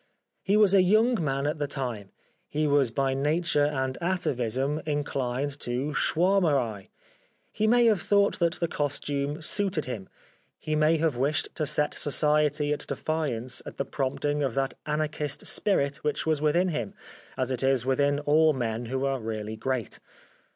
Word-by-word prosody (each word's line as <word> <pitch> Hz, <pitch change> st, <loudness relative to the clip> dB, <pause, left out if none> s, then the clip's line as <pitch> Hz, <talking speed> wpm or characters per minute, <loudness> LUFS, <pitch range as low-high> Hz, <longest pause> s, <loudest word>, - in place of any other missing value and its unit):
He 205 Hz, +2 st, +2 dB
was 210 Hz, -3 st, +5 dB
a 195 Hz, -, +7 dB
young 215 Hz, +2 st, +3 dB
man 135 Hz, -1 st, -1 dB
at 150 Hz, +1 st, -1 dB
the 145 Hz, -, -1 dB
time; 120 Hz, -8 st, -4 dB, 0.4 s
he 155 Hz, +1 st, -1 dB
was 145 Hz, -4 st, +3 dB
by 135 Hz, +3 st, 0 dB
nature 150 Hz, +2 st, +1 dB
and 130 Hz, -3 st, -2 dB
atavism 140 Hz, -5 st, -1 dB
inclined 140 Hz, -1 st, -2 dB
to 130 Hz, +5 st, -2 dB
Schwaermerei; 150 Hz, -, +1 dB, 0.6 s
he 215 Hz, -, 0 dB
may 240 Hz, +1 st, +5 dB
have 215 Hz, -5 st, +3 dB
thought 200 Hz, 0 st, +2 dB
that 170 Hz, -1 st, +2 dB
the 170 Hz, -, -2 dB
costume 145 Hz, 0 st, -2 dB
suited 190 Hz, -2 st, 0 dB
him; 110 Hz, -7 st, -6 dB, 0.5 s
he 155 Hz, 0 st, -3 dB
may 155 Hz, +2 st, +3 dB
have 155 Hz, -5 st, 0 dB
wished 145 Hz, +3 st, 0 dB
to 155 Hz, -, -2 dB
set 150 Hz, 0 st, +1 dB
Society 150 Hz, 0 st, +2 dB
at 150 Hz, -, -5 dB
defiance 130 Hz, -7 st, -2 dB
at -, -, -10 dB
the 140 Hz, -, -1 dB
prompting 145 Hz, +2 st, -2 dB
of 135 Hz, -5 st, -1 dB
that 135 Hz, -1 st, 0 dB
Anarchist 150 Hz, -1 st, -2 dB
spirit 140 Hz, -9 st, +1 dB
which 150 Hz, -1 st, -2 dB
was 155 Hz, -2 st, +1 dB
within 170 Hz, +5 st, +2 dB
him, 120 Hz, -, -4 dB, 0.4 s
as 130 Hz, 0 st, -1 dB
it 130 Hz, -, -2 dB
is 135 Hz, -2 st, +2 dB
within 140 Hz, +2 st, +2 dB
all 155 Hz, +2 st, +4 dB
men 120 Hz, -2 st, -3 dB
who 130 Hz, +3 st, -2 dB
are 135 Hz, -1 st, 0 dB
really 110 Hz, -1 st, -4 dB
great. 120 Hz, 0 st, -3 dB
145 Hz, 165 wpm, -27 LUFS, 130-155 Hz, 0.6 s, a